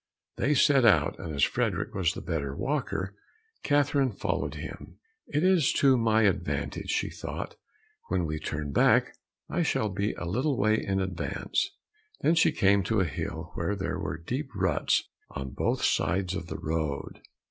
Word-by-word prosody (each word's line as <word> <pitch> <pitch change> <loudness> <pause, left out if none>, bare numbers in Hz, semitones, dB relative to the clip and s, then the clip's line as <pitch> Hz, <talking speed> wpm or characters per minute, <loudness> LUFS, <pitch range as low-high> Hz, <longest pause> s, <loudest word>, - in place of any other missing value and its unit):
They 145 +4 +2
set 135 -1 +5
out, 115 -3 +4
and 80 - -5
as 70 - +1
Frederick - - 0
was 95 -2 +1
the - - -5
better 70 -5 -2
walker, 95 +6 -2 0.5
Catherine 145 -2 +2
followed - - -2
him. - - -8 0.3
"It 150 +3 0
is 185 -6 +4
to 135 -2 +5
my 110 -2 +3
advantage," 90 -8 0
thought - - -5
she, - - -21 0.5
"when 90 -2 0
we 80 -1 -3
turn 75 -2 -4
back - - +3 0.3
I 175 - -1
shall 110 -9 +1
be 100 +2 -1
a 85 - -6
little 125 - 0
way 110 +1 +2
in 95 0 0
advance." 95 -2 -1 0.5
Then 160 - +4
she 165 - +4
came 100 +1 +3
to 110 -2 +1
a 95 - +3
hill 80 +2 -5
where 85 +5 -1
there 95 -1 -3
were 85 -5 -3
deep 130 - -4
ruts 90 -6 +2 0.3
on 65 -1 -6
both 70 - -1
sides 95 0 +1
of 95 -3 -4
the - - -5
road. 80 -3 -3
95 Hz, 170 wpm, -28 LUFS, 80-125 Hz, 0.5 s, set